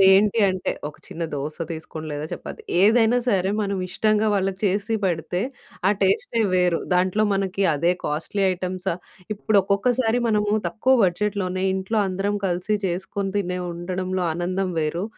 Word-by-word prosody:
ఇప్పుడేంటి 195 Hz, +3 st, +6 dB
అంటే, 185 Hz, -1 st, -1 dB, 0.2 s
ఒక 150 Hz, -, -12 dB
చిన్న 170 Hz, -, -6 dB
దోస 145 Hz, +2 st, -4 dB
తీసుకోండి 160 Hz, -1 st, -6 dB
లేదా 145 Hz, +1 st, -3 dB
చెపాతి 440 Hz, -, -7 dB, 0.2 s
ఏదైనా 225 Hz, +3 st, +5 dB
సరే 190 Hz, -4 st, +2 dB
మనం 200 Hz, -1 st, -1 dB
ఇష్టంగా 215 Hz, +3 st, +2 dB
వాళ్ళకి 195 Hz, -1 st, 0 dB
చేసి 205 Hz, +4 st, 0 dB
పెడితే 175 Hz, 0 st, -1 dB, 0.5 s
ఆ -, -, +5 dB
టేస్టే 195 Hz, +4 st, +2 dB
వేరు. 180 Hz, -2 st, +3 dB
దాంట్లో 185 Hz, +4 st, +2 dB
మనకి 195 Hz, 0 st, -1 dB
అదే 170 Hz, +5 st, +2 dB
కాస్ట్‌లీ 165 Hz, +7 st, -2 dB
ఐటెమ్స 185 Hz, +1 st, -5 dB, 0.5 s
ఇప్పుడు 205 Hz, 0 st, +2 dB
ఒక్కొక్కసారి 225 Hz, +4 st, +1 dB
మనము 210 Hz, -1 st, +1 dB, 0.2 s
తక్కువ 260 Hz, +4 st, +2 dB
బడ్జెట్లోనే 185 Hz, 0 st, -1 dB
ఇంట్లో 190 Hz, +4 st, -1 dB
అందరం 195 Hz, +2 st, -1 dB
కలిసి 180 Hz, +4 st, 0 dB
చేసుకొని 190 Hz, +2 st, -3 dB
తినే 180 Hz, -2 st, -2 dB
ఉండడంలో 185 Hz, +1 st, -2 dB
ఆనందం 185 Hz, +2 st, -1 dB
వేరు. 160 Hz, +4 st, -1 dB
190 Hz, 140 wpm, -23 LUFS, 180-205 Hz, 0.5 s, ఇప్పుడేంటి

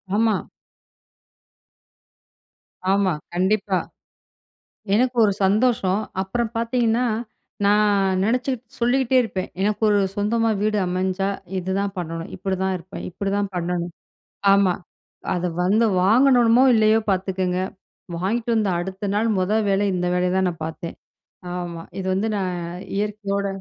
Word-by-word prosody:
ஆமா. 220 Hz, -1 st, +3 dB, 2.6 s
ஆமா. 195 Hz, -3 st, +2 dB, 0.2 s
கண்டிப்பா. 190 Hz, +1 st, +1 dB, 1.2 s
எனக்கு 250 Hz, +3 st, +2 dB
ஒரு 200 Hz, -, +2 dB
சந்தோஷம் 210 Hz, -1 st, +2 dB, 0.2 s
அப்புறம் 225 Hz, +4 st, -2 dB
பார்த்தீங்கன்னா, 235 Hz, +1 st, +1 dB, 0.6 s
நான் 200 Hz, -2 st, +3 dB
நினைச்சி. 250 Hz, +5 st, +1 dB, 0.3 s
சொல்லிகிட்டே 255 Hz, +1 st, +2 dB
இருப்பேன். 190 Hz, -4 st, -4 dB
எனக்கு 210 Hz, +2 st, 0 dB
ஒரு 205 Hz, -1 st, +4 dB, 0.2 s
சொந்தமா 225 Hz, +2 st, +1 dB
வீடு 215 Hz, 0 st, +1 dB
அமைஞ்சா, 185 Hz, +2 st, -1 dB, 0.3 s
இதுதான் 195 Hz, +2 st, -2 dB
பண்ணணும். 165 Hz, -1 st, -5 dB
இப்படிதான் 190 Hz, -1 st, -1 dB
இருப்பேன். 180 Hz, +2 st, -9 dB
இப்படிதான் 200 Hz, +2 st, -2 dB
பண்ணணும். 175 Hz, 0 st, -2 dB, 0.6 s
ஆமா. 195 Hz, -2 st, +4 dB, 0.6 s
அத 180 Hz, 0 st, -1 dB, 0.2 s
வந்து 215 Hz, +5 st, +3 dB, 0.2 s
வாங்கணுமோ 245 Hz, +3 st, +5 dB
இல்லையோ 220 Hz, 0 st, +4 dB
பார்த்துக்கங்க. 185 Hz, -1 st, -1 dB, 0.6 s
வாங்கிட்டு 225 Hz, +7 st, -1 dB
வந்து 210 Hz, -3 st, +2 dB
அடுத்த 190 Hz, +3 st, -4 dB
நாள் 225 Hz, +2 st, +1 dB
மொத 185 Hz, +3 st, +1 dB, 0.2 s
வேலை 195 Hz, +1 st, +2 dB
இந்த 180 Hz, 0 st, -1 dB
வேலைய 180 Hz, 0 st, +1 dB
தான் 190 Hz, -1 st, +2 dB
நான் 165 Hz, -2 st, -7 dB
பார்த்தேன். 165 Hz, +1 st, -6 dB, 0.6 s
ஆமா. 170 Hz, -2 st, -5 dB, 0.2 s
இது 190 Hz, -, -4 dB
வந்து 200 Hz, +4 st, 0 dB
நான் 185 Hz, -2 st, -2 dB, 0.4 s
இயற்கையோட 200 Hz, -1 st, -2 dB
200 Hz, 115 wpm, -22 LUFS, 185-220 Hz, 2.6 s, வாங்கணுமோ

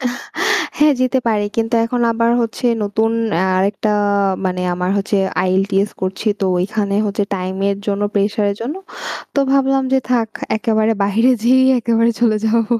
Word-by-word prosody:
আহ! 245 Hz, -2 st, -2 dB, 0.6 s
হ্যাঁ, 300 Hz, 0 st, +5 dB
যেতে 255 Hz, +1 st, +2 dB
পারি। 210 Hz, -2 st, +1 dB
কিন্তু 225 Hz, +1 st, 0 dB
এখন 245 Hz, +1 st, -2 dB
আবার 230 Hz, +1 st, +1 dB
হচ্ছে 235 Hz, +2 st, -3 dB, 0.2 s
নতুন 220 Hz, +2 st, 0 dB, 0.5 s
আরেকটা 200 Hz, +3 st, 0 dB, 0.6 s
মানে 180 Hz, 0 st, -2 dB
আমার 180 Hz, +1 st, -2 dB
হচ্ছে 200 Hz, +1 st, -1 dB, 0.3 s
IELTS 195 Hz, +2 st, +1 dB
করছি। 190 Hz, +3 st, -4 dB
তো -, -, +1 dB
ঐখানে 200 Hz, +2 st, -1 dB
হচ্ছে 205 Hz, 0 st, -1 dB
টাইমের 190 Hz, +2 st, -2 dB
জন্য 205 Hz, 0 st, -1 dB
প্রেশারের 205 Hz, 0 st, +1 dB
জন্য 250 Hz, +7 st, -3 dB, 0.6 s
তো -, -, +1 dB
ভাবলাম 270 Hz, 0 st, +2 dB
যে 265 Hz, -, +4 dB
থাক 235 Hz, -3 st, +2 dB, 0.3 s
একেবারে 220 Hz, -1 st, +1 dB
বাহিরে 225 Hz, +6 st, +3 dB
যেয়েই 260 Hz, +2 st, +4 dB
একেবারে 230 Hz, 0 st, +2 dB
চলে 220 Hz, -3 st, +3 dB
যাব। 230 Hz, +1 st, +2 dB
220 Hz, 150 wpm, -17 LUFS, 200-235 Hz, 0.6 s, হ্যাঁ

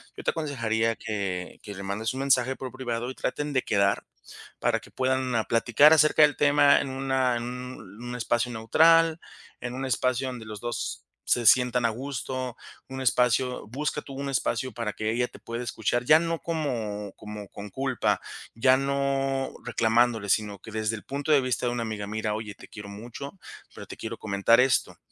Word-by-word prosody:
Yo -, -, -8 dB
te -, -, +2 dB
aconsejaría 115 Hz, -7 st, -1 dB
que 100 Hz, -4 st, -4 dB
que 105 Hz, -2 st, -8 dB
le 100 Hz, -, -7 dB
mandes 105 Hz, +4 st, -2 dB
un 130 Hz, -, -4 dB
mensaje 130 Hz, -1 st, +3 dB
por 130 Hz, -1 st, -6 dB
privado 120 Hz, -2 st, -3 dB
y -, -, -10 dB
traten 145 Hz, +3 st, -3 dB
de 130 Hz, -, +2 dB
quedar, 100 Hz, -1 st, +1 dB, 0.5 s
para -, -, +1 dB
que -, -, -16 dB
puedan 130 Hz, -3 st, 0 dB
platicar 120 Hz, +6 st, +5 dB
acerca 155 Hz, 0 st, +5 dB
del 145 Hz, -, +4 dB
tema 145 Hz, 0 st, +5 dB
en 140 Hz, -, -4 dB
una 130 Hz, -2 st, 0 dB
en 120 Hz, -, -4 dB
un 125 Hz, -2 st, -7 dB
espacio 120 Hz, +1 st, 0 dB
neutral, 160 Hz, +8 st, +4 dB, 0.4 s
en 120 Hz, 0 st, -4 dB
un 135 Hz, +1 st, -3 dB
espacio 130 Hz, +1 st, 0 dB
donde 125 Hz, -4 st, -6 dB
los 105 Hz, -1 st, -7 dB
2 120 Hz, 0 st, -4 dB, 0.2 s
se 120 Hz, -1 st, +1 dB
sientan 125 Hz, 0 st, +5 dB
a -, -, +4 dB
gusto, 130 Hz, 0 st, -4 dB, 0.3 s
un 130 Hz, 0 st, -6 dB
espacio 125 Hz, +1 st, +2 dB
busca 150 Hz, +5 st, -2 dB
tú 140 Hz, -, -11 dB
un 140 Hz, +1 st, -4 dB
espacio 130 Hz, -2 st, -1 dB
para 115 Hz, -2 st, -3 dB
que 110 Hz, 0 st, -2 dB
ella 125 Hz, +1 st, 0 dB
te -, -, -14 dB
pueda 115 Hz, +1 st, -5 dB
escuchar, 120 Hz, 0 st, -1 dB
ya 155 Hz, +3 st, +7 dB
no 165 Hz, -1 st, -2 dB
como 115 Hz, -, -3 dB
como 105 Hz, -1 st, -8 dB
con 105 Hz, 0 st, -9 dB
culpa, 130 Hz, +3 st, 0 dB, 0.4 s
ya 130 Hz, +3 st, +5 dB
no 135 Hz, -1 st, 0 dB
reclamándole, 115 Hz, -2 st, +2 dB
sino 105 Hz, -1 st, +1 dB
que 110 Hz, -, -11 dB
desde 110 Hz, +1 st, -1 dB
el -, -, -12 dB
punto 140 Hz, +3 st, -2 dB
de 145 Hz, -, +7 dB
vista 125 Hz, -1 st, -1 dB
de -, -, +1 dB
una 120 Hz, -1 st, -2 dB
amiga: 105 Hz, -2 st, -4 dB
"Mira, 110 Hz, 0 st, -2 dB
oye, 105 Hz, -2 st, -6 dB
te -, -, -14 dB
quiero 105 Hz, -1 st, -9 dB
mucho, 120 Hz, -, -8 dB, 0.4 s
pero -, -, -8 dB
te -, -, -9 dB
quiero -, -, -6 dB
comentar 105 Hz, +3 st, +3 dB
esto", 130 Hz, 0 st, +1 dB
125 Hz, 190 wpm, -27 LUFS, 110-135 Hz, 0.5 s, ya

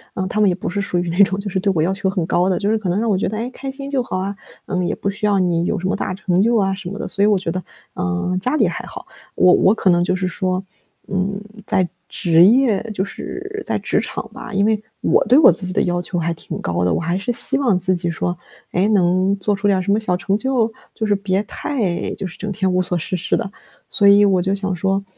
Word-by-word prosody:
嗯， 185 Hz, 0 st, -2 dB
他 215 Hz, -, -2 dB
们 200 Hz, -, +5 dB
也 175 Hz, -, +1 dB
不 190 Hz, -, -6 dB
是 200 Hz, +2 st, -2 dB
属 180 Hz, -2 st, -2 dB
于 175 Hz, -1 st, -2 dB
那 170 Hz, -, -3 dB
种 195 Hz, +1 st, 0 dB
就 200 Hz, 0 st, -4 dB
是 190 Hz, -, -1 dB
对 195 Hz, +1 st, +1 dB
我 155 Hz, -, +2 dB
要 185 Hz, +4 st, +1 dB
求 195 Hz, 0 st, -1 dB
很 185 Hz, -4 st, -1 dB
高 180 Hz, +2 st, +2 dB
的， 185 Hz, -, +1 dB
就 205 Hz, 0 st, -1 dB
是 220 Hz, -, +2 dB
可 195 Hz, -4 st, -3 dB
能 190 Hz, +4 st, +1 dB
让 230 Hz, 0 st, 0 dB
我 195 Hz, -, +2 dB
觉 -, -, 0 dB
得， 215 Hz, -, -4 dB
“哎， 240 Hz, +3 st, -3 dB
开 270 Hz, +1 st, -7 dB
心 275 Hz, +1 st, -6 dB
就 270 Hz, -3 st, 0 dB
好 185 Hz, -, -3 dB
啊， 195 Hz, +2 st, -3 dB, 0.3 s
嗯， 180 Hz, -2 st, -1 dB
也 -, -, -1 dB
不 200 Hz, -, -2 dB
需 210 Hz, +1 st, -3 dB
要 205 Hz, -1 st, +3 dB
你 175 Hz, -2 st, +1 dB
有 205 Hz, -, -1 dB
什 185 Hz, -, -2 dB
么 -, -, 0 dB
大 185 Hz, -, -3 dB
成 185 Hz, -1 st, 0 dB
就 235 Hz, +2 st, +3 dB
啊” 195 Hz, -1 st, +1 dB
什 190 Hz, -2 st, -6 dB
么 200 Hz, -, -6 dB
的。 -, -, -4 dB
所 200 Hz, -, -1 dB
以 -, -, +6 dB
我 205 Hz, -2 st, +4 dB
觉 175 Hz, -3 st, -3 dB
得， 185 Hz, +1 st, -4 dB, 0.3 s
嗯， 90 Hz, -, -1 dB
家 255 Hz, +7 st, 0 dB
里 -, -, +3 dB
还 -, -, -4 dB
好， -, -, -9 dB, 0.3 s
我 180 Hz, 0 st, +5 dB
我 195 Hz, -, +5 dB
可 190 Hz, -, +1 dB
能 175 Hz, 0 st, +4 dB
就 185 Hz, -, +1 dB
是 185 Hz, 0 st, -1 dB
说， 185 Hz, +1 st, -2 dB, 0.4 s
嗯， 195 Hz, +1 st, -1 dB, 0.3 s
在 185 Hz, -2 st, +1 dB, 0.2 s
职 170 Hz, 0 st, +4 dB
业 230 Hz, -2 st, +4 dB
就 190 Hz, -, -1 dB
是 400 Hz, -, -6 dB
在 -, -, 0 dB
职 -, -, 0 dB
场 -, -, -5 dB
吧， 230 Hz, -, -9 dB
因 200 Hz, +1 st, +2 dB
为， 215 Hz, -1 st, +1 dB, 0.2 s
我 -, -, +3 dB
对 255 Hz, -, +5 dB
我 315 Hz, -, +8 dB
自 180 Hz, +3 st, -3 dB
己 185 Hz, -, -3 dB
的 -, -, +2 dB
要 175 Hz, -1 st, 0 dB
求 180 Hz, 0 st, -4 dB
还 170 Hz, +1 st, -1 dB
挺 -, -, -7 dB
高 90 Hz, 0 st, -1 dB
的， 90 Hz, -, +2 dB
我 -, -, 0 dB
还 170 Hz, +3 st, -1 dB
是 225 Hz, +5 st, -2 dB
希 260 Hz, -, -1 dB
望 240 Hz, -10 st, +2 dB
自 185 Hz, +1 st, +1 dB
己 175 Hz, 0 st, -2 dB
说， 175 Hz, +1 st, -2 dB, 0.3 s
哎， 185 Hz, +4 st, +2 dB
能 185 Hz, 0 st, +3 dB
做 205 Hz, +2 st, 0 dB
出 205 Hz, +1 st, -1 dB
点 195 Hz, -2 st, +3 dB
儿 -, -, -1 dB
什 200 Hz, -, -1 dB
么 210 Hz, -, +3 dB
小 185 Hz, -5 st, 0 dB
成 195 Hz, +3 st, 0 dB
就， 245 Hz, -3 st, 0 dB, 0.2 s
就 220 Hz, -, -3 dB
是 205 Hz, -, +2 dB
别 195 Hz, 0 st, 0 dB
太 210 Hz, -7 st, -2 dB
就 -, -, -5 dB
是 175 Hz, -, -12 dB
整 210 Hz, -, -5 dB
天 190 Hz, -2 st, 0 dB
无 185 Hz, 0 st, +2 dB
所 180 Hz, -1 st, -1 dB
事 185 Hz, +3 st, -3 dB
事 180 Hz, -, 0 dB
的。 195 Hz, -, -3 dB, 0.4 s
所 200 Hz, -2 st, +3 dB
以 200 Hz, +1 st, +7 dB
我 190 Hz, -3 st, +3 dB
就 190 Hz, +2 st, 0 dB
想 195 Hz, -1 st, -2 dB
说， 195 Hz, +3 st, 0 dB
195 Hz, 305 characters per minute, -20 LUFS, 180-205 Hz, 0.4 s, 我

